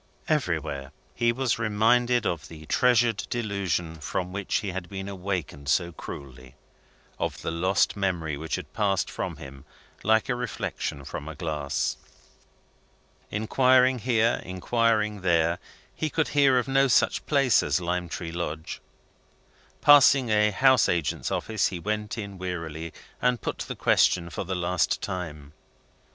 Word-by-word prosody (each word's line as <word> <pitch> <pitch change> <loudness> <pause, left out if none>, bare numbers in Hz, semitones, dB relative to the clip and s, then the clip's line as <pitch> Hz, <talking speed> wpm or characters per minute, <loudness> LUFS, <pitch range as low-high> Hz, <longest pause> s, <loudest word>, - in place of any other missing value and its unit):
Everywhere, 80 - -1 0.2
he 120 -1 +2
was 125 -1 -1
reminded 120 +2 +2
of 80 -3 -2
the 80 -1 -11
treasured 120 +2 +3
delusion 100 -7 -2
from 90 +5 -3
which 100 -1 -3
he 100 - 0
had 90 -1 -6
been 95 0 -6
awakened 90 -7 -4
so 85 +3 +2
cruelly 65 -5 -10 0.6
of - - -3
the - - -2
lost 95 +4 +1
memory 90 -6 -1
which 80 +3 -3
had 80 -5 -8
passed 100 -3 0
from - - -4
him 65 0 -11 0.4
like 110 +1 +3
a 130 - +1
reflection 120 - -4
from 75 - -6
a 80 - -7
glass. 75 -5 -2 1.3
Inquiring 125 +4 +3
here, 115 -1 +2
inquiring 105 +2 0
there, 85 -1 +2 0.3
he 155 - -2
could 160 +1 0
hear 140 -3 +4
of 125 - 0
no 135 0 +3
such 120 - +2
place 135 -6 +4
as - - 0
Lime 90 0 -2
Tree 85 0 -5
Lodge. 80 -2 -5 1.0
Passing 140 -3 +7
a 105 0 +4
house 130 +3 +4
agent's 85 -5 -1
office, 110 -2 0
he 95 - -4
went 105 +5 -3
in 100 -3 -6
wearily, 85 -3 -5 0.3
and 125 -1 +2
put - - -4
the - - -5
question 85 -2 +2
for 90 - -4
the 95 +1 -3
last 90 0 0
time. 75 -7 -5
95 Hz, 145 wpm, -26 LUFS, 85-115 Hz, 1.3 s, Passing